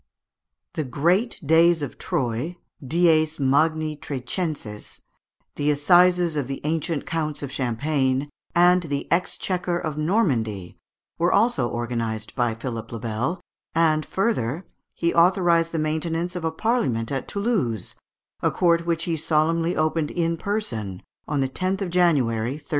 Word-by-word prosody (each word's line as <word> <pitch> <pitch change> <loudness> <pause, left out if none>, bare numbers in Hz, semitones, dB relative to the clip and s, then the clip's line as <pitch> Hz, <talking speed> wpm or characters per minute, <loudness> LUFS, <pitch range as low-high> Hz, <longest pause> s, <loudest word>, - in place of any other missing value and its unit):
The 155 - -2
Great 175 - +1
Days 165 +1 +4
of 140 - -6
Troyes 135 0 -2 0.3
(dies 160 +1 +2
magni 155 +3 +2
Trecenses), 145 - -5 0.5
the 145 +1 +1
assizes 175 +3 +4
of 145 -4 -1
the 135 0 -4
ancient 160 0 -1
counts 155 -3 -2
of 140 - -5
Champagne, 135 +2 0 0.3
and 180 +1 +5
the 145 -4 -3
exchequer 180 0 0
of 155 -3 -4
Normandy, 125 - 0 0.4
were 175 +2 +3
also 200 - +2
organized 115 -2 -3
by 120 -3 0
Philipe 115 -1 -6
le 115 - -5
Bel; 120 - -2 0.3
and, 155 -2 +3
further, 185 - -1 0.3
he 170 0 0
authorised 170 -1 +4
the 165 - -2
maintenance 165 +3 -1
of 175 - -4
a 160 - +1
Parliament 160 - 0
at 135 -2 -3
Toulouse, 195 - -1 0.5
a - - +3
court 170 -1 +2
which 165 -1 0
he 170 -1 -1
solemnly 165 +2 +1
opened 155 0 0
in 165 -1 0
person 120 - -4 0.2
on 145 -2 0
the 135 - +1
10th 185 +8 -2
of 185 - -3
January, 130 -10 +2
1302. 150 +1 -12
155 Hz, 140 wpm, -24 LUFS, 130-175 Hz, 0.5 s, and